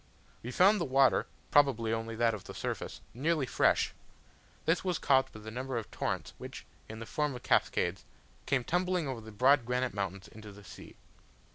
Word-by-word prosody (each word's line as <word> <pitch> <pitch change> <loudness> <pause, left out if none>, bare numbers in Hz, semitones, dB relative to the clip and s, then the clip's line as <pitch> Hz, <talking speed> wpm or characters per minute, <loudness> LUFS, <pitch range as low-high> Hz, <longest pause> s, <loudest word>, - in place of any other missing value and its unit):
We 120 - -6
found 195 +10 +4
the - - +1
water 135 -1 +3 0.2
(probably 120 -6 +4
only 115 0 -3
that 115 0 +2
of 105 - -7
the - - -9
surface) - - -4
nearly 150 +4 0
fresh: - - +2 0.7
this 165 +2 +2
was 180 -3 0
caused 135 -1 +3
by 110 - -11
the 110 +1 -8
number 130 +2 -3
of 115 - -5
torrents - - -3
which, - - -8 0.2
in 110 - -7
the 115 - -7
form 150 +2 -1
of 125 - -9
cascades, - - +1 0.4
came 135 -3 +1
tumbling 180 +1 0
over 130 -4 -4
the 110 0 -11
bold 130 +5 +4
granite 125 +1 -1
mountains 100 -1 -4
into 110 -1 -11
the 100 +1 -14
sea. - - -12
125 Hz, 185 wpm, -31 LUFS, 110-140 Hz, 0.7 s, found